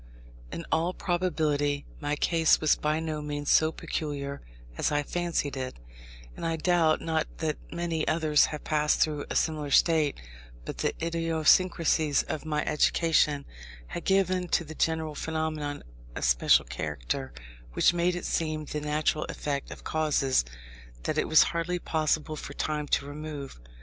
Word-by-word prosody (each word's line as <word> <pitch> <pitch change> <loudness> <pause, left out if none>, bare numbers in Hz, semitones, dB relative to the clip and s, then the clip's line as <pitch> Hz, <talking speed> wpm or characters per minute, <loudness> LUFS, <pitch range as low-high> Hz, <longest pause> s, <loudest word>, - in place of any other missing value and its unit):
In 170 - -5
all 170 +3 +1
probability 155 -6 0
my 145 -1 -1
case 165 +1 +3
was 155 - +4
by 155 +1 0
no 155 -2 -3
means 145 -1 -2
so 155 0 +5
peculiar 140 -3 -4 0.3
as - - 0
I 145 0 +1
fancied 170 -3 -2
it, 130 -1 -5 0.6
and - - -8
I 165 -1 0
doubt 160 -1 +2
not 160 -1 0
that 155 -2 -2
many 170 -2 -2
others 155 -2 +4
have 150 - -6
passed 150 -1 +1
through 150 -2 +1
a - - -4
similar 155 -3 0
state; 155 0 +3 0.5
but - - -6
the - - 0
idiosyncrasies 165 -2 +2
of 155 - -5
my 150 -1 -1
education 150 -1 +2 0.4
had 170 - -5
given 185 -2 +2
to 175 - +1
the 160 0 -9
general 160 -1 0
phenomenon 155 -2 -3 0.3
a - - -4
special - - +4
character, 65 -4 -4 0.4
which 175 - +4
made 175 +1 +1
it 175 - -5
seem 155 -2 -1
the 150 0 -4
natural 150 +1 0
effect 140 -2 -4
of - - -10
causes 150 - +1 0.6
that - - 0
it - - 0
was 155 - +7
hardly 170 +1 -1
possible 155 -2 -1
for 145 - -7
time 150 -1 -2
to 140 - +1
remove. 145 - -7
155 Hz, 155 wpm, -28 LUFS, 145-165 Hz, 0.6 s, was